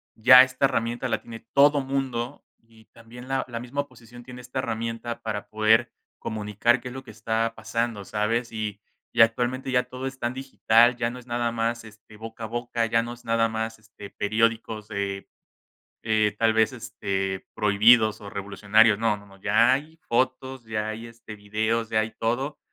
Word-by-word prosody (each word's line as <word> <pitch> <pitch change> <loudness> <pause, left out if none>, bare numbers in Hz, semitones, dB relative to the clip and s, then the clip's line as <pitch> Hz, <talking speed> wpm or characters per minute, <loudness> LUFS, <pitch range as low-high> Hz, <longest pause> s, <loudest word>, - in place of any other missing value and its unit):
ya 125 +3 +9
esta 130 +1 0
herramienta 120 -1 -1
la 110 - -1
tiene 115 -1 -11
todo 145 0 +5
mundo, 135 -1 -3 0.2
y 115 -1 -22
también 120 +2 -13
la 135 0 0
la 115 -2 -5
misma 125 +4 -3
oposición 120 -3 -14
tiene 125 0 -10
esta 125 +1 -5
herramienta 115 0 -4
para 105 -2 -4
poder 110 +2 +3 0.3
comunicar 110 +3 0
qué 125 +1 -7
es 125 - -9
lo 130 - -8
que - - -15
está 110 +1 -1
pasando, 110 -1 -3
¿sabes? 115 +4 -1
Y 105 -2 -4 0.3
y - - +3
actualmente 125 +3 +2
ya 125 -1 +3
todo 130 +1 -7
es 135 0 -6
tan 120 +1 -2
digital, 120 -2 +3
ya 120 -1 -1
no 125 - -8
es 125 - -12
nada 120 -1 -1
más, 115 0 -2
este, 105 -1 -16
boca 110 +1 -9
a - - -3
boca, 120 0 -2
ya 115 0 +2
no 120 +1 -6
es 120 0 -16
nada 115 0 +2
más, 110 0 -4
este, 105 -2 -13
periódicos 110 0 -1
de, 100 -2 -4 0.8
eh, 110 -2 +1
tal 115 -1 +3
vez, 110 -1 +3
este, 95 -1 -4
prohibidos 110 +1 +4
o 100 - -8
revolucionarios, 100 +2 +3
no 110 -2 +1
no 100 - -16
no, 95 -1 -17
ya 110 +5 +4
hay 155 +4 -6
fotos, 130 +1 -1
ya 110 -1 -3
hay, 110 +2 -6
este, 115 -2 -11
videos, 110 +2 -1
ya 110 -1 +2
hay 110 0 -3
todo, 125 +6 -1
115 Hz, 185 wpm, -25 LUFS, 110-125 Hz, 0.8 s, ya